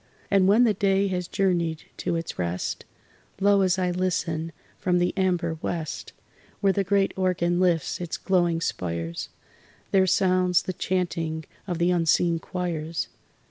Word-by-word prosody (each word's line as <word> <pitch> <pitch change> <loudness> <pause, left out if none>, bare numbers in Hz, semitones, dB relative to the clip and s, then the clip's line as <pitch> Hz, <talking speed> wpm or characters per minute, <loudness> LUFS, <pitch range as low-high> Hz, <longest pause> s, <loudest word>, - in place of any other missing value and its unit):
And 195 -2 +5
when 215 +5 +6
the 225 -3 +4
day 195 0 +2
has 180 -2 -2
journeyed 170 -5 0
to - - -1
its 165 0 -4
rest, 90 +1 -2 0.5
Lo, 200 0 +4
as 185 -1 +2
I 180 -1 +1
listen, 165 -3 -1 0.3
from 180 -1 +1
the 175 0 +1
amber 175 -4 0
west, 160 -3 -4 0.5
Where 195 -2 +3
the 200 - +1
great 195 +1 +2
organ 175 -2 +1
lifts 175 -2 +1
its 175 -2 -3
glowing 175 -3 +1
spires, 85 - -3 0.6
There 190 -1 +4
sounds 185 -1 +3
the 185 - -3
chanting 165 -4 -2 0.2
of 175 -3 -2
the 175 +1 +2
unseen 170 0 +2
choirs. 165 -3 -3
180 Hz, 145 wpm, -25 LUFS, 165-190 Hz, 0.6 s, when